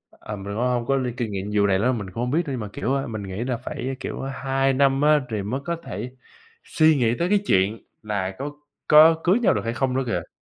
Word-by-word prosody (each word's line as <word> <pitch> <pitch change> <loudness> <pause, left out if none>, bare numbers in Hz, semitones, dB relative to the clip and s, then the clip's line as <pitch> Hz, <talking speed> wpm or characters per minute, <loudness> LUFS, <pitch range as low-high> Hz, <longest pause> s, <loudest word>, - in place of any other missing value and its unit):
ờ, 105 - -8
mình 95 - -9
cũng - - -6
hông 120 -2 0
có 135 - +2
linh 125 -3 -2
kinh 120 -4 -2
nghiệm 100 +1 -4
vụ 100 -1 +4
này 95 -1 +2
nữa, 125 +5 +2
mình 100 -6 -4
cũng 115 +6 -4
hông 125 - -1
biết, 160 +6 +2
nhưng 135 -4 -3
mà 105 - -5
kiểu, 130 - -2
ơ, 135 0 -1
mình 110 -3 -5
nghĩ 95 +3 -4
là 125 -1 -1
phải, 130 +1 -5
kiểu, - - -5
2 135 0 0
năm 135 +1 +2
á, 150 0 +4
thì 105 -3 -2
mới 125 +7 -3
có 170 - -2
thể 125 +1 -7 0.5
suy 155 -1 +3
nghĩ 120 -3 +2
tới 170 +1 0
cái 205 - +4
chuyện 100 - +2 0.2
là 95 -3 -3
có 145 +2 -4 0.4
có 160 +2 +7
cưới 185 +6 +4
nhau 240 - +3
được - - -1
hay 115 +1 -2
không 130 0 0
nữa 135 - +1
kìa. 85 -8 -3
125 Hz, 265 wpm, -23 LUFS, 105-140 Hz, 0.5 s, có